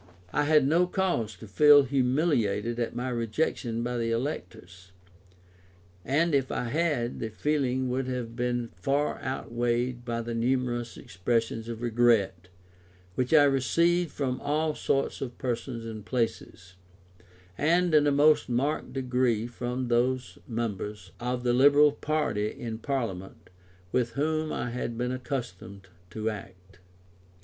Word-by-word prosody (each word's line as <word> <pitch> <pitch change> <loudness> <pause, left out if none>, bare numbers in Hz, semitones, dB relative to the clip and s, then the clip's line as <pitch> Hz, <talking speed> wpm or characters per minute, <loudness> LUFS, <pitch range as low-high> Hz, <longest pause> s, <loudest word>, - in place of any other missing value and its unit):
I 145 - +2
had 150 -2 +4
no 170 +4 +3
cause 175 - -1
to 100 +5 -12
feel 145 +8 +7
humiliated 125 -5 +1
at 120 0 -2
my 125 +2 -2
rejection 115 0 -1
by 120 0 -2
the 115 0 -1
electors; 95 - -5 1.1
and 155 +5 +1
if 135 -2 +1
I - - -1
had, 145 -5 0
the 110 - -3
feeling 130 +1 0
would 130 +1 -1
have 125 -3 -4
been 120 -1 -1
far 140 - -1
outweighed 120 -1 -2
by 115 -1 -3
the 115 0 -4
numerous 120 0 -1
expressions 115 +4 -2
of 115 0 -6
regret 110 -7 +2 0.7
which 125 +5 -1
I 155 -2 +7
received 165 +6 +2
from 130 -3 -3
all 155 +2 0
sorts 140 -1 -1
of 125 -3 -5
persons 120 -1 -3
and 110 -2 -7
places, 110 -6 -3 0.8
and 170 - +2
in 150 -1 +5
a - - +4
most 150 +1 +4
marked 135 +5 -1
degree 125 -4 0
from 125 +1 -4
those 120 -5 0
members 105 -4 -4
of 125 0 -2
the 120 -1 +2
liberal 145 +3 +6
party 145 -8 -1
in 110 -1 -6
Parliament, 110 -11 -4 0.4
with 120 -2 0
whom 155 +2 -1
I 120 - -3
had 120 -1 -4
been 125 +1 -1
accustomed 120 -7 -6 0.2
to 110 +5 -4
act. 95 -3 -11
125 Hz, 140 wpm, -28 LUFS, 115-140 Hz, 1.1 s, feel